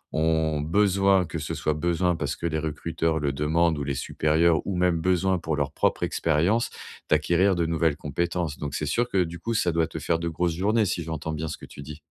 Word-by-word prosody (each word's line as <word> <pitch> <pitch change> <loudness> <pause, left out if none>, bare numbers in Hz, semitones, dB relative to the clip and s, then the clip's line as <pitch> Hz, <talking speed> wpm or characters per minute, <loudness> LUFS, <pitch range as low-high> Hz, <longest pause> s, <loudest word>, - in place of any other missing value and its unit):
ont 80 -1 +1
besoin 95 +3 +3
que - - -5
ce - - -4
soit 75 - 0
besoin 85 +2 +1
parce 70 -1 -3
que - - -7
les 80 -2 0
recruteurs 80 +1 -1
le 70 -2 0
demandent 80 +2 +1
ou - - -2
les 70 -1 -2
supérieurs 80 +4 +2
ou 100 - -1
même 90 -2 +2
besoin 95 0 +2
pour 80 -2 -2
leur 70 -1 -1
propre - - 0
expérience, 85 +9 +1 0.4
d'acquérir 85 +5 +3
de 85 -1 0
nouvelles 80 -2 +1
compétences. 85 +1 -2
Donc 75 -2 -4
c'est - - -2
sûr 120 +1 0
que 95 -2 +2
du 85 0 -7
coup 115 +6 -3
ça 90 -5 +2
doit 80 0 +1
te 80 - -8
faire 80 +1 0
de 85 0 -2
grosses 85 +1 -1
journées 105 +5 +2
si 90 - -1
j'entends 80 -1 -4
bien 80 +1 -3
ce 75 - -5
que - - -11
tu 70 - -11
dis? 75 +2 -9
80 Hz, 225 wpm, -25 LUFS, 75-90 Hz, 0.4 s, besoin